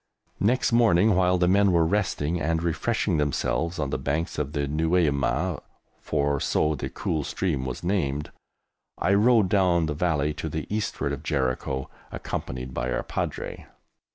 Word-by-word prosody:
Next 120 +3 +2
morning, 110 -3 +4
while 90 0 +3
the 90 0 +2
men 100 +1 +4
were 85 -2 +3
resting 90 -3 0
and 80 +2 0
refreshing 90 +2 0
themselves 80 +3 -1
on 70 -4 -2
the - - -1
banks 75 +6 -2
of 75 0 -3
the 75 - -1
Nueiameh 75 -4 +1 0.4
(for 70 -1 0
so 75 +3 +1
the 75 - -4
cool 75 -2 -2
stream 75 -8 -2
was 65 - -5
named), 75 -6 -1 0.7
I 100 - +2
rode 110 0 +4
down 90 -4 +3
the 75 - -2
Valley 75 -2 0
to 80 - -5
the 75 -1 -4
eastward 70 -10 -2
of 70 - -5
Jericho, 65 -3 -1 0.2
accompanied 65 0 -5
by 60 0 -2
our - - -1
Padre. - - -4
80 Hz, 155 wpm, -26 LUFS, 70-95 Hz, 0.7 s, morning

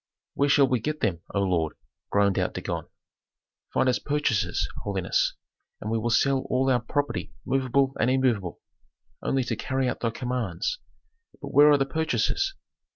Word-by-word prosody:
"Where 140 +1 +1
shall 140 -1 +5
we 125 -2 +1
get 150 +6 -3
them, 90 -6 0
O 100 - +2
lord?" 85 -5 0 0.3
groaned 100 -1 +2
out - - -1
Dagon. - - -4 0.8
"Find 130 - +2
us 125 -1 +2
purchasers, 125 - 0 0.2
holiness, 95 -3 0 0.4
and 105 - -4
we 115 - +1
will 120 +2 -1
sell 135 +4 +3
all 130 +1 +2
our 125 - +3
property 145 +5 -2
movable 135 0 +1
and 120 - +3
immovable, 120 -9 0 0.6
only 135 -1 0
to 120 - -2
carry 130 0 -1
out - - -2
thy 115 - 0
commands. 125 - -2 0.6
But - - -7
where 145 +1 +8
are 145 - +6
the 135 - +1
purchasers? 160 - 0
130 Hz, 160 wpm, -26 LUFS, 110-140 Hz, 0.8 s, where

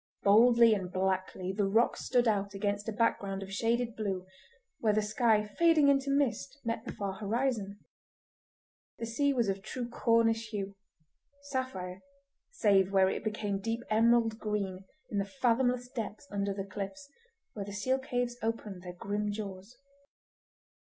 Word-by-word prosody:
Boldly 230 +2 +6
and 190 -4 -2
blackly 185 0 -1
the 205 -1 +1
rock 225 +5 +3
stood 245 -2 +1
out 200 -2 0
against 205 +1 -1
a - - -1
background 200 -3 0
of 195 0 -9
shaded 230 +2 0
blue, 195 -4 -3 0.5
where 215 -2 +2
the 215 - +2
sky 215 0 +2
fading 310 +6 +4
into 275 0 +2
mist 275 -1 0
met 230 -1 -2
the - - -4
far 200 -2 -4
horizon. 215 -1 -1 1.2
The 230 - -4
sea 280 +5 +1
was 240 -5 +1
of 195 0 -1
true 245 +4 -5
Cornish 230 -1 +2
hue—sapphire, 200 - -7 0.5
save 200 - +3
where 190 -1 +4
it - - -4
became 210 -2 -2
deep 225 +3 -2
emerald 225 0 +3
green 200 -3 -3 0.3
in 205 - 0
the 200 0 -3
fathomless 245 0 +2
depths 230 -2 -6
under 200 0 -1
the 195 0 -4
cliffs, 200 +9 -6 0.5
where 200 -2 -5
the 200 - -7
seal 255 +7 0
caves 245 -2 -2
opened 220 -4 -3
their 180 -1 -8
grim 205 +3 -2
jaws. 200 +1 -7
215 Hz, 150 wpm, -31 LUFS, 195-240 Hz, 1.2 s, Boldly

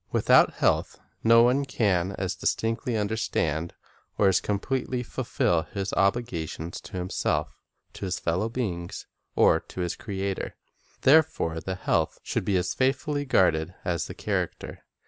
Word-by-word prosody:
Without - - +4
health, - - +1 0.2
no 115 +1 +7
one 130 +4 +3
can 100 -8 0
as 95 -1 -2
distinctly 115 +5 -1
understand 85 -7 -1 0.4
or 100 - +4
as 95 - +3
completely 125 +4 -2
fulfil 85 -7 0
his 100 -1 -2
obligations 90 -6 -1
to - - -13
himself, 90 0 -2 0.3
to - - -6
his 90 -1 -2
fellow 90 +7 -1
beings, 95 -8 -4 0.3
or - - +5
to 95 - -8
his 90 -1 -2
Creator. 100 -2 -4 0.5
There 155 +4 +7
fore 80 - -4
the 95 +2 -4
health 90 - 0
should - - -2
be 100 -1 +2
as 90 0 -1
faithfully 145 +2 0
guarded 90 - +2
as 85 -3 -1
the - - -8
character. - - -3
100 Hz, 145 wpm, -26 LUFS, 90-120 Hz, 0.5 s, no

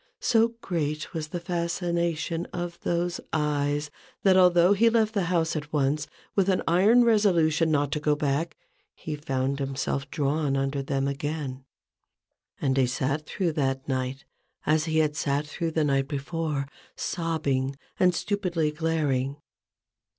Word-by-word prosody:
So 230 0 +3
great 155 -4 -2
was 160 -2 -3
the 175 - -4
fascination 170 -1 -1
of 175 -1 -5
those 175 0 -1
eyes, 150 -1 0 0.3
that, 190 -2 +5
although 180 0 +6
he 230 +3 +4
left 220 -1 +2
the 200 -5 +1
house 170 -2 +1
at 150 -1 -4
once, 145 0 +1 0.3
with 195 -1 +3
an 185 - +2
iron 205 +8 +5
resolution 175 -8 +3
not 145 -2 +1
to 150 - 0
go 150 0 +2
back, 145 +3 -1 0.4
he 155 - -5
found 135 -1 -2
himself 135 0 -2
drawn 145 -1 0
under 135 +1 -1
them 135 0 -1
again, 140 -2 -4 0.9
and 135 -1 +1
he 130 -2 +4
sat 140 +4 -2
through 180 -1 -1
that 135 -3 -1
night 130 0 -2 0.4
as 155 0 +2
he 160 -1 0
had 155 -1 +2
sat 145 -1 0
through 165 +3 -3
the 160 -1 0
night 135 -2 +1
before, 145 0 -2 0.3
sobbing 145 -6 -1 0.2
and 180 -1 +4
stupidly 180 -7 0
glaring. 150 -4 0
155 Hz, 145 wpm, -27 LUFS, 140-170 Hz, 0.9 s, although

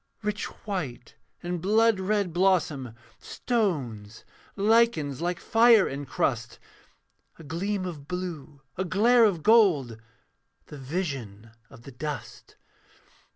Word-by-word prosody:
'Rich 210 0 -2 0.2
white 155 - -5 0.3
and 175 -1 -3
blood 220 +2 +3
red 195 -2 -1
blossom; 165 -10 +1 0.2
stones, 130 - -3 0.3
Lichens 200 - +2
like 175 0 -2
fire 225 -2 +5
encrust; 135 -4 -3 0.8
A 165 - -13
gleam 185 +6 -3
of 150 -6 -7
blue, 165 -6 -6 0.2
a - - +1
glare 225 +7 +4
of 175 -7 0
gold, 160 - +3 0.6
The 150 - -11
vision 130 - -5 0.2
of 115 - -15
the 140 - -11
dust. 145 +2 -7
175 Hz, 110 wpm, -26 LUFS, 140-205 Hz, 0.8 s, fire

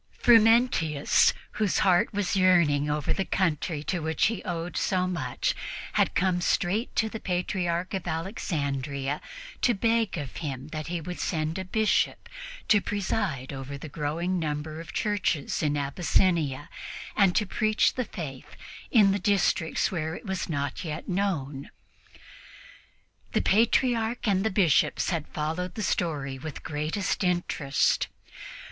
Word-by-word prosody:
Frumentius, 225 - +5 0.2
whose 210 -3 0
heart 180 -2 +4
was 205 -2 -1
yearning 170 -6 +4
over 150 -1 0
the 195 - -1
country 165 -4 -1
to 180 +3 -1
which 160 0 +1
he 215 - -7
owed 175 0 -4
so 185 -2 +1
much, 165 -9 -1 0.4
had - - +2
come 180 -1 +2
straight 190 +6 0
to 220 - +2
the 220 0 -6
Patriarch 180 -1 -1
of 190 -2 -3
Alexandria 145 - -2 0.4
to 240 - +3
beg 225 -1 +1
of 145 -4 -6
him 140 -3 -5
that 155 0 -5
he 175 0 -2
would 180 +3 -6
send 160 +1 -1
a - - -3
Bishop 215 +4 +1 0.4
to 205 -2 +5
preside 190 -11 -2
over 135 +1 -6
the 150 - -8
growing 170 +5 -2
number 155 0 -3
of 165 - -10
churches 205 -8 -1
in 150 -1 +1
Abyssinia 150 -1 +1 0.5
and 195 -3 +4
to 210 - +3
preach 215 +2 +2
the 255 - -2
Faith 140 -11 -8 0.3
in 210 -5 +5
the 200 - 0
districts 190 -4 +1
where 160 -2 -2
it - - -10
was 190 -3 -3
not 140 -1 -2
yet 155 -1 -5
known. 160 -8 -2 1.6
The - - +2
Patriarch 230 +2 +2
and 195 -2 +2
the 220 - +2
Bishops 190 -5 +2
had 165 -4 -2
followed 165 +4 -3
the 215 - -3
story 145 -7 -1
with 155 +1 -6
the - - -8
greatest 155 +8 -2
interest. 175 -6 +1
175 Hz, 145 wpm, -27 LUFS, 150-195 Hz, 1.6 s, Frumentius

